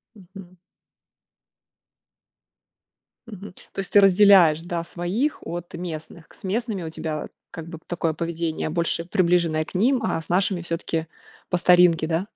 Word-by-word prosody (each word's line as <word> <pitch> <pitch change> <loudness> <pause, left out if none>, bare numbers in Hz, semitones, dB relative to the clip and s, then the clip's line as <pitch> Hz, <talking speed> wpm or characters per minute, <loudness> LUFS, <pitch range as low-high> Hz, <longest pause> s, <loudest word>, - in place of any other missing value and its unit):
Мгм. 185 -2 -14 2.7
Мгм. 205 -3 -10 0.2
То - - -16
есть 195 - -6
ты 205 - +7
разделяешь, 190 -5 +6
да, 175 -1 -3
своих 190 - -2
от 175 0 -6
местных? 165 -1 -7
К - - -19
с - - -19
местными 210 -1 -2
у 160 - -5
тебя, 155 -1 -4 0.2
как 165 - -8
бы 165 - -8
такое 165 -2 -1
поведение 165 -1 -3
больше 170 0 -1
приближенное 170 -3 +1
к 160 - -14
ним, 245 +7 +2
а, 165 - -1
с - - -14
нашими 180 0 +1
всё-таки 165 -1 -3 0.4
по 180 - 0
старинке, 175 -2 +4
да? 165 +4 -1
175 Hz, 145 wpm, -23 LUFS, 165-190 Hz, 2.7 s, ты